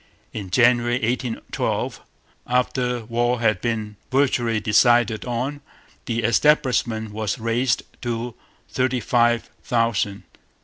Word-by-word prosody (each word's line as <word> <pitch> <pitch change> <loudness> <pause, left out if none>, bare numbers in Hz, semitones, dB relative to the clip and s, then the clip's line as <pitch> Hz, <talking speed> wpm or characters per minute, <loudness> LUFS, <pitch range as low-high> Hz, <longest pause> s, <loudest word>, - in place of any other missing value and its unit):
In 100 -4 -6
January 120 +3 +3
1812, 120 0 -2 0.5
after 125 -1 0
war 120 +1 0
had 110 -5 +1
been 110 -3 -3
virtually 125 -4 +2
decided 110 +2 +3
on, 130 +4 -3 0.5
the 115 -1 -1
establishment 120 -3 +2
was 105 0 -2
raised 115 +1 0 0.2
to 120 -1 -3 0.3
thirty 130 -1 0
five 120 0 +1
thousand. 115 -4 0
120 Hz, 100 wpm, -22 LUFS, 110-125 Hz, 0.5 s, January